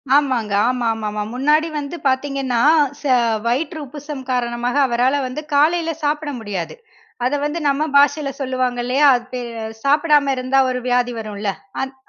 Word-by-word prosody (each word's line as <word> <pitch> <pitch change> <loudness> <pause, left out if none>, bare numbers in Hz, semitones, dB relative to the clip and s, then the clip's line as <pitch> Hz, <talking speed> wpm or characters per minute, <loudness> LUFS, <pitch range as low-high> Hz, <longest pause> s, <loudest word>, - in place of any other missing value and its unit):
ஆமாங்க, 255 -7 +1 0.2
ஆமாமாமா. 225 -4 -1
முன்னாடி 300 +5 +2
வந்து 290 +2 -5
பாத்தீங்கன்னா, 265 -2 0 0.4
ச - - -18 0.4
வயிற்று 290 +6 -1
உப்புசம் 290 0 -8
காரணமாக 240 0 -1
அவரால 250 +4 +1
வந்து 255 +4 -5
காலையில 325 +3 +3
சாப்பிட 300 +1 -1
முடியாது. 200 -6 -5 0.5
அத 255 - 0
வந்து 300 +3 -2
நம்ம 280 +2 +1
பாஷையில 285 0 +3
சொல்லுவாங்க 255 -2 -1
இல்லையா? 265 +4 +3
அது 245 0 -4
பே 250 - -3 0.4
சாப்பிடாம 295 0 +3
இருந்தா 255 +1 +1
ஒரு 250 0 -2
வியாதி 245 0 +1
வரும்ல? 210 -2 -3 0.3
அத் 265 0 -6
265 Hz, 140 wpm, -20 LUFS, 245-290 Hz, 0.5 s, காலையில